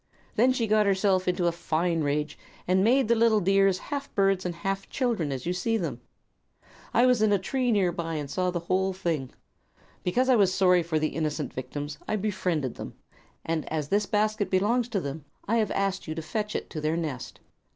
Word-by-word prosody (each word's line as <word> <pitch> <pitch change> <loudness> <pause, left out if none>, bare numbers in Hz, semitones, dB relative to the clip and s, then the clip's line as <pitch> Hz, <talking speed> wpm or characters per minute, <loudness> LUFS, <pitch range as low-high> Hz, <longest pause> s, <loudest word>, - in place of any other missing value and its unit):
Then 245 +4 +4
she 255 -3 0
got 215 -1 +3
herself 190 -1 +2
into 180 -1 +1
a 170 - +3
fine 165 0 -1
rage 150 +1 -1 0.3
and 185 +1 +3
made 250 +3 +4
the 235 - +4
little 225 -1 +4
dears 195 0 +3
half 280 +4 -5
birds 195 -2 +2
and 175 - -4
half 195 +3 -3
children, 230 - -1
as 130 -2 -4
you 175 - 0
see 225 +5 0
them. 145 - -4 0.9
I 240 - +4
was 250 -3 +3
in 215 -1 +4
a 200 - +4
tree 245 +6 -1
near 195 -5 +2
by, 165 -1 -4
and 150 -2 -3
saw 180 +5 -1
the 175 -1 -2
whole 190 +2 0
thing. 165 -8 -2 0.7
Because 245 +9 +1
I 260 - +5
was 200 -4 +4
sorry 180 -1 +4
for 165 -1 -1
the 155 0 +1
innocent 155 -2 -3
victims 145 +3 -5
I - - 0
befriended 185 - -1
them, - - -7 0.5
and 165 -2 -2
as 150 -2 -2
this 205 0 +1
basket 215 0 0
belongs 225 +6 +1
to 215 -4 0
them 145 -1 -5 0.2
I 230 +3 +2
have 215 -3 +1
asked 195 -2 -1
you 155 - -4
to 165 - -3
fetch 210 +5 -3
it - - -4
to 155 - -4
their 155 +2 0
nest." 150 -7 -5
185 Hz, 210 wpm, -27 LUFS, 160-215 Hz, 0.9 s, I